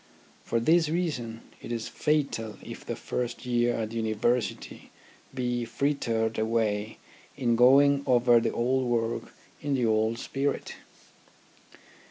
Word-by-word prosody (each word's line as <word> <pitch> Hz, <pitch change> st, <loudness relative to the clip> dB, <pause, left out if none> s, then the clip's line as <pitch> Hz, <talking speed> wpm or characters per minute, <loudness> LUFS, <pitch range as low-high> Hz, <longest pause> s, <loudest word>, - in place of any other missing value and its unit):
For 115 Hz, -, 0 dB
this 160 Hz, +6 st, +3 dB
reason 135 Hz, -10 st, -2 dB, 0.2 s
it -, -, -8 dB
is 115 Hz, -2 st, -3 dB
fatal 140 Hz, -8 st, -1 dB
if -, -, -9 dB
the -, -, -4 dB
first 125 Hz, 0 st, -4 dB
year 120 Hz, -1 st, +1 dB
at 110 Hz, -1 st, -3 dB
the 115 Hz, -, -5 dB
University 115 Hz, +2 st, -1 dB, 0.4 s
be 125 Hz, -2 st, -2 dB
frittered 115 Hz, -3 st, -1 dB
away 110 Hz, -1 st, 0 dB, 0.4 s
in 120 Hz, -4 st, +1 dB
going 140 Hz, +4 st, +6 dB
over 120 Hz, -1 st, +5 dB
the -, -, -1 dB
old 130 Hz, +2 st, 0 dB
work 115 Hz, -1 st, -1 dB, 0.3 s
in 145 Hz, -1 st, 0 dB
the 125 Hz, -2 st, +1 dB
old 110 Hz, +1 st, +1 dB
spirit. 135 Hz, +2 st, -2 dB
120 Hz, 130 wpm, -28 LUFS, 115-135 Hz, 0.4 s, going